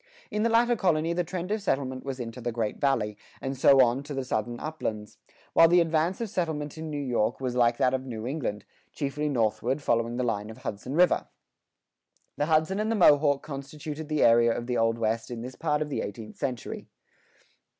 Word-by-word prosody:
In 210 - -1
the 230 - +2
latter 235 +1 +4
colony 170 -5 +1
the 175 +1 0
trend 180 +2 -5
of 215 0 0
settlement 130 -8 -1
was 135 -1 -5
into 120 +1 -6
the 120 +1 -2
Great 110 -2 -2
Valley, 120 -7 +1 0.2
and 135 +1 -3
so 135 +1 +6
on 120 +2 +1
to 145 0 -7
the 135 -1 -2
Southern 120 0 -2
uplands; 110 -9 -5 0.3
while 165 - +7
the 175 +2 +5
advance 165 +2 +1
of 230 - -2
settlement 160 -6 -3
in 160 0 -6
New 150 - -4
York 125 -4 0
was 130 -2 -2
like 120 -1 +3
that 125 - +2
of 130 0 -1
New 115 -3 -5
England, 125 -7 -3 0.3
chiefly 150 +1 -2
northward, 120 +1 0
following 115 -3 0
the 125 - 0
line 105 -3 -2
of 110 - -9
Hudson 115 +7 -5
River. 180 +2 +3 1.1
The 145 - -1
Hudson 160 +5 +2
and 215 +1 0
the - - +1
Mohawk 145 -6 +5
constituted 150 +2 -7
the 155 -1 +2
area 115 0 +5
of 120 +1 -3
the 125 0 -2
Old 115 0 +2
West 115 0 -1
in 120 -2 -5
this 130 +1 -7
part 150 0 0
of 150 - -8
the - - -1
eighteenth 105 +2 -7
century. 130 -4 -4
135 Hz, 205 wpm, -27 LUFS, 120-155 Hz, 1.1 s, while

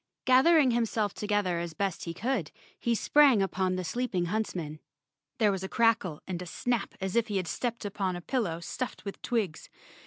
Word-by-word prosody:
Gathering 265 +2 +6
himself 225 -3 0
together 205 -4 0
as 170 -2 -5
best 195 -2 -2
he 170 - -4
could, 230 - -1 0.3
he 235 -1 +1
sprang 280 -1 +5
upon 185 -1 0
the 185 - -2
sleeping 185 -1 -1
hunts¬ 215 +4 -2
man. 155 -3 -5 0.6
There 210 -2 +4
was 190 -1 -3
a 190 - -4
crackle 225 -9 +2
and 180 -2 -4
snap 240 +1 -2
as 190 +1 -3
if 235 -1 +3
he 205 -3 -1
had 185 -3 -2
stepped 235 +1 -3
upon 195 -2 -2
a 175 - -6
pillow 175 -7 -1
stuffed 250 +8 -5
with 200 - -6
twigs. 210 -9 -2
205 Hz, 185 wpm, -29 LUFS, 180-235 Hz, 0.6 s, Gathering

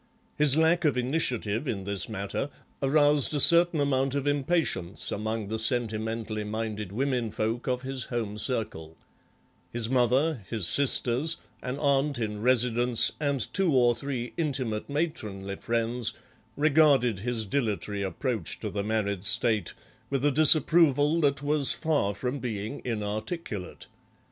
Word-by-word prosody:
His 150 -1 +3
lack 165 +2 +2
of 145 -5 +1
initiative 125 -3 -1
in 100 -6 -3
this 100 -1 -1
matter 105 +6 -4 0.3
aroused 145 +1 +3
a - - 0
certain 170 +2 +8
amount 135 -1 0
of 140 -1 -2
impatience 145 - -1
among 110 0 -4
the 110 0 -3
sentimentally 110 -2 -1
minded 105 -2 -5
women 125 0 -1
folk 110 +3 -3
of 125 0 -2
his 130 -2 -5
home 110 -4 -4
circle; 80 - -2 0.7
his 115 0 -3
mother, 130 +1 +1
his 110 -6 0
sisters, 140 - +1 0.2
an 125 +2 -5
aunt 140 -1 +1
in 105 -3 -4
residence, 120 -1 +4
and 140 -5 -2
two 185 -7 +1
or 120 -2 +4
three 120 0 -5
intimate 130 -9 -2
matronly 105 - -4
friends 115 0 -2 0.4
regarded 145 -7 +3
his 115 0 -2
dilatory 105 -4 -2
approach 100 - -3
to - - -4
the 100 -1 -3
married 100 -3 -2
state 110 0 +1 0.3
with 135 0 -1
a 145 - +3
disapproval 155 0 +4
that 140 -1 +1
was 145 -1 +2
far 145 -11 -1
from 125 +6 -4
being 110 +1 -5
inarticulate. 110 - -5
125 Hz, 135 wpm, -27 LUFS, 110-145 Hz, 0.7 s, certain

